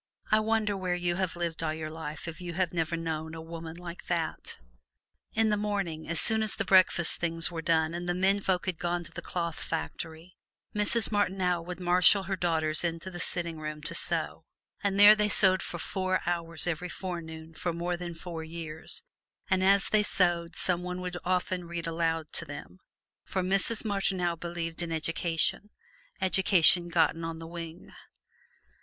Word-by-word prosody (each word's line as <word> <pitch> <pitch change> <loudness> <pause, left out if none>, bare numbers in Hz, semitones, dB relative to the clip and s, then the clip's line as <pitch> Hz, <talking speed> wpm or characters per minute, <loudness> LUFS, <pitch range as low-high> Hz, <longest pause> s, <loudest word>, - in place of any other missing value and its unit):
I 215 - +5
wonder 215 -1 0
where 185 -2 -2
you 175 -1 -1
have 185 -3 -2
lived 170 -2 -3
all 155 -1 -2
your 155 -1 -6
life 155 0 -7
if 165 +2 -7
you 175 -1 -6
have 180 -1 -1
never 165 -1 -1
known 160 -1 -4
a - - -7
woman 165 0 -8
like 175 0 -9
that? 170 -2 -3 0.8
In 225 0 +2
the 210 - +2
morning, 195 -7 -3
as 170 -1 0
soon 220 0 +10
as 215 -2 0
the 210 - -2
breakfast 185 -3 +4
things 165 0 +1
were 165 -1 -4
done 160 -1 +1
and 175 +1 -4
the 175 - 0
men 190 +2 +2
folks 190 -1 -1
had 185 -4 -3
gone 175 0 -2
to - - -10
the - - -7
cloth 170 -2 -4
factory, 165 +1 -6 0.4
Mrs. 210 +2 +2
Martineau 185 -4 0
would 175 +1 -7
marshal 180 +2 +5
her 195 +1 -2
daughters 160 -3 0
in 170 -1 -1
the 175 +1 -8
sitting 170 -2 -3
room 155 -1 -6
to - - -1
sew. - - 0 0.4
And 200 -1 0
there 205 +1 +10
they 210 0 +1
sewed 190 -2 +6
for 175 - -6
four 185 +2 -2
hours 170 -2 -2
every 175 +1 -3
forenoon 165 -4 -7
for 175 +2 -3
more 175 +1 -2
than 175 -1 -7
four 165 -1 -7
years; 160 -1 -6 0.5
and 190 0 +2
as 195 +1 +4
they 215 - +3
sewed 175 -4 0
some 180 -1 +1
one 180 0 -5
would 180 0 -5
often 180 0 -1
read 170 -1 -5
aloud 165 -1 -2
to - - -2
them, 115 -11 -10 0.4
for 185 - -3
Mrs. 195 +4 +2
Martineau 190 -4 -1
believed 170 0 -4
in 170 -1 -4
education 165 +4 0 0.5
education 185 -2 +5
gotten 165 -1 +1
on 165 0 -4
the 165 - -9
wing. 165 0 -9
175 Hz, 185 wpm, -28 LUFS, 165-185 Hz, 0.8 s, soon